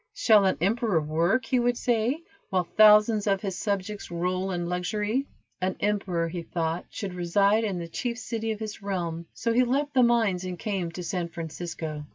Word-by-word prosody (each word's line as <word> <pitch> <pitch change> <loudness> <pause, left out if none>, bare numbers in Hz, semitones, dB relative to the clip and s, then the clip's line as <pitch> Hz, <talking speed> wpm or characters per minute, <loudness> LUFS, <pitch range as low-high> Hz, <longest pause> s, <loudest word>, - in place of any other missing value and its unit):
"Shall 220 - +5
an 190 - +2
emperor 210 -1 +2
work," 165 +10 +1
he 255 - +1
would 245 0 +1
say, 245 +6 0 0.3
"while 185 -1 +1
thousands 210 +3 +5
of 195 0 +1
his 195 -3 -2
subjects 200 +1 -3
roll 180 +2 -1
in 175 -2 -2
luxury?" 210 +9 -1 0.3
An 185 0 0
emperor, 190 -5 0
he 170 +1 -4
thought, 165 0 -2
should 195 -3 -5
reside 200 +5 +2
in 200 -4 -1
the 170 -1 -5
chief 235 +8 -3
city 225 -1 -3
of 215 - -4
his 215 -1 -6
realm, 170 -4 -3
so 230 - 0
he 250 +2 +4
left 280 +4 0
the 260 - +4
mines 225 -7 +3
and 180 -1 -5
came 190 -4 -2
to 180 - -6
San 175 -1 -2
Francisco. 160 -2 -5
195 Hz, 190 wpm, -27 LUFS, 175-220 Hz, 0.3 s, Shall